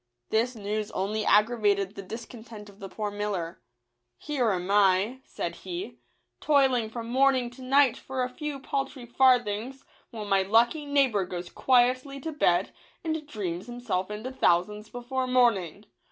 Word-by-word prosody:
This 235 +3 +1
news 210 0 -3
only 210 +3 -1
aggravated 205 -3 +3
the 200 - -7
discontent 225 +1 -9
of 200 0 -17
the 195 -2 -7
poor 210 +1 -4
miller. 200 -5 -4 0.3
" 120 0 -53
Here 265 -6 +1
am 185 -1 -1
I," 200 +4 +3
said - - -5
he, 360 +2 -7 0.2
" - - -50
toiling 265 -6 +3
from 230 0 -6
morning 260 0 +2
to 250 +2 -14
night 265 -1 +4
for 265 -1 -3
a 250 - -2
few 295 +2 -5
paltry 270 -1 -4
farthings, 245 0 +2 0.2
while 220 -3 -7
my 195 -1 +3
lucky 235 +9 +2
neighbour 270 -8 +2
goes 180 -1 -6
quietly 255 +2 +2
to 320 - -4
bed, 185 - +2 0.3
and 315 -2 -3
dreams 190 - -4
himself 240 -6 -3
into 215 +5 -5
thousands 210 -1 +1
before 255 +2 -3
morning. 220 -7 +2
230 Hz, 155 wpm, -27 LUFS, 200-260 Hz, 0.3 s, night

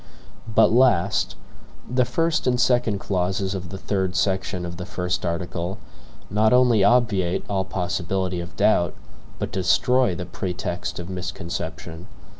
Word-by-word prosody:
But - - +6
last, 110 -5 +3 0.5
the 125 0 +2
first 160 +5 0
and 125 -1 +2
second 125 -4 +2
clauses 95 0 -1
of 95 -2 -5
the 95 - -6
third 95 -2 -1
section 95 -2 0
of 85 0 -6
the 90 - -5
first 90 -3 -2
article, 85 +1 -3 0.5
not 110 +3 +3
only 125 -5 +5
obviate 105 -8 +2
all 95 -2 -1
possibility 90 0 -2
of 85 0 -8
doubt, 85 -6 +3 0.4
but - - -4
destroy 95 +4 +2
the 90 - -5
pretext 90 -1 -4
of 85 - -6
misconception. 85 -1 -6
95 Hz, 135 wpm, -23 LUFS, 90-110 Hz, 0.5 s, But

